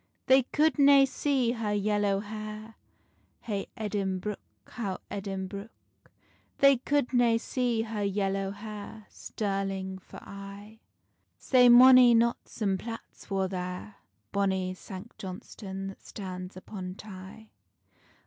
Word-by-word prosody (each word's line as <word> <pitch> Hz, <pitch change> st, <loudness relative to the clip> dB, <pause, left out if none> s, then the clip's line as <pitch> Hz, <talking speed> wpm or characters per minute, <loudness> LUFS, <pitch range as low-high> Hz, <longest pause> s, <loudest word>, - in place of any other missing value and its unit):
They 265 Hz, +1 st, +6 dB
could 300 Hz, +4 st, +1 dB
nae 280 Hz, -1 st, +7 dB
see 260 Hz, -2 st, 0 dB
her 225 Hz, -3 st, -2 dB
yellow 205 Hz, -1 st, +1 dB
hair, 215 Hz, +1 st, -7 dB, 0.7 s
Hey 200 Hz, -3 st, -3 dB
Edinbruch, 205 Hz, -1 st, -2 dB, 0.3 s
how 200 Hz, -6 st, -4 dB
Edinbruch. 195 Hz, +1 st, -5 dB, 0.9 s
They 275 Hz, -1 st, +6 dB
could 280 Hz, +1 st, 0 dB
nae 240 Hz, -2 st, +4 dB
see 240 Hz, -1 st, -1 dB
her 220 Hz, -2 st, -4 dB
yellow 195 Hz, -1 st, 0 dB
hair, 210 Hz, +1 st, -8 dB
Stirling 195 Hz, -2 st, -3 dB
for -, -, -13 dB
aye: 200 Hz, +2 st, -10 dB, 0.6 s
Sae 250 Hz, -2 st, +5 dB
mony 250 Hz, 0 st, +9 dB
knots 235 Hz, -1 st, 0 dB
and 195 Hz, -2 st, +1 dB
platts 230 Hz, +2 st, -9 dB
war 195 Hz, -1 st, 0 dB
there, 180 Hz, +2 st, -5 dB, 0.3 s
Bonny 190 Hz, -2 st, 0 dB
Sanct 190 Hz, +3 st, -10 dB
Johnstonne 190 Hz, +1 st, -7 dB
that 195 Hz, -, -12 dB
stands 185 Hz, -2 st, -7 dB
upon 185 Hz, -1 st, -7 dB
Tay. 205 Hz, +2 st, -11 dB
205 Hz, 115 wpm, -29 LUFS, 195-230 Hz, 0.9 s, mony